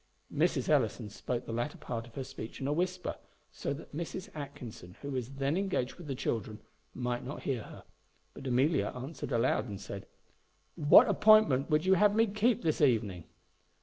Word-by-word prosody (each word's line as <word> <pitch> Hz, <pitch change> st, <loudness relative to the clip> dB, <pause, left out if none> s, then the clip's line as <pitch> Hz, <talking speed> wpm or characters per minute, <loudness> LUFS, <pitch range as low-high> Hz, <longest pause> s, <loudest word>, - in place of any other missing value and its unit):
Mrs. -, -, +1 dB
Ellison 105 Hz, -, +1 dB
spoke 120 Hz, +3 st, -3 dB
the 115 Hz, -, -5 dB
latter 120 Hz, +6 st, -2 dB
part 115 Hz, -1 st, -5 dB
of 115 Hz, -, -18 dB
her 135 Hz, -, -3 dB
speech 130 Hz, -4 st, -8 dB
in 135 Hz, -, -4 dB
a 145 Hz, -, +1 dB
whisper, 180 Hz, +2 st, -2 dB, 0.3 s
so -, -, -4 dB
that 145 Hz, 0 st, -7 dB
Mrs. 170 Hz, +3 st, -5 dB
Atkinson, 125 Hz, -, -8 dB
who 140 Hz, -, -4 dB
was 130 Hz, 0 st, -4 dB
then 135 Hz, +2 st, 0 dB
engaged 185 Hz, -10 st, -1 dB
with 175 Hz, -4 st, -10 dB
the 135 Hz, -, -2 dB
children, 110 Hz, -3 st, -3 dB, 0.4 s
might 125 Hz, -1 st, -2 dB
not 135 Hz, +4 st, -7 dB
hear 130 Hz, -5 st, -1 dB
her; -, -, -11 dB, 0.5 s
but 135 Hz, -, -8 dB
Amelia 130 Hz, +6 st, +2 dB
answered 135 Hz, +4 st, -6 dB
aloud, 120 Hz, 0 st, +1 dB
and 100 Hz, -2 st, -6 dB
said, 100 Hz, -1 st, -7 dB, 0.7 s
"What 160 Hz, -, +7 dB
appointment 210 Hz, -, +5 dB
would 155 Hz, +2 st, +2 dB
you 190 Hz, -, +5 dB
have 205 Hz, +2 st, +4 dB
me 225 Hz, +1 st, +5 dB
keep 215 Hz, +2 st, +1 dB
this 155 Hz, -2 st, +1 dB
evening?" 105 Hz, -, +2 dB
135 Hz, 180 wpm, -31 LUFS, 120-170 Hz, 0.7 s, What